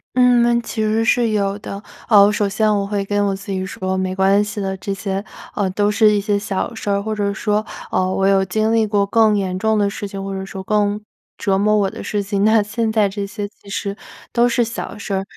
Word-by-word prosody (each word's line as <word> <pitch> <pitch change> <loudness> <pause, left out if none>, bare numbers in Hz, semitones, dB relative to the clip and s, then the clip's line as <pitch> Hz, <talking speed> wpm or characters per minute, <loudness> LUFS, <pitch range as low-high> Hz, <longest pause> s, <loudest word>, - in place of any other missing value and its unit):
嗯， 240 -1 +4
其 225 - -4
实 220 +1 +1
是 235 +1 +3
有 200 -1 0
的， 200 -1 -7 0.3
呃， 205 -2 +7
首 205 -1 0
先 215 +1 +2
我 200 -1 -1
会 200 -1 -2
跟 205 0 0
我 195 - 0
自 195 - -8
己 190 -1 -2
说 190 0 -3
没 185 0 -2
关 195 +2 +3
系 210 0 -5
的， 190 -1 -2
这 195 +1 -5
些， 195 0 -3 0.3
呃， 200 -2 0
都 205 +2 +1
是 210 +1 +4
一 210 - +2
些 205 0 0
小 200 +3 -3
事 220 - -5
儿， 200 0 +1
或 220 +1 -2
者 205 -1 -1
说， 210 +1 0 0.3
呃， 185 0 +1
我 195 0 +1
有 195 -1 +4
经 215 +4 0
历 220 -1 +3
过 205 -1 +2
更 215 0 +3
严 185 -2 -2
重 220 +1 +1
的 205 -1 +2
事 205 +1 -5
情， 195 0 -6
或 195 - -4
者 190 0 -4
说 190 0 -7
更 210 +1 0 0.4
折 195 -4 +1
磨 210 +2 +3
我 200 -2 +2
的 - - -8
事 205 -1 -2
情， 200 0 -1
那 220 0 +4
现 220 +2 -2
在 215 -2 +3
这 200 0 -4
些 205 0 -5
其 200 -1 -18
实 200 0 -3 0.4
都 240 0 +3
是 240 0 +2
小 230 -2 -5
事 205 0 -5
儿。 195 0 0
205 Hz, 260 characters per minute, -19 LUFS, 195-215 Hz, 0.4 s, 呃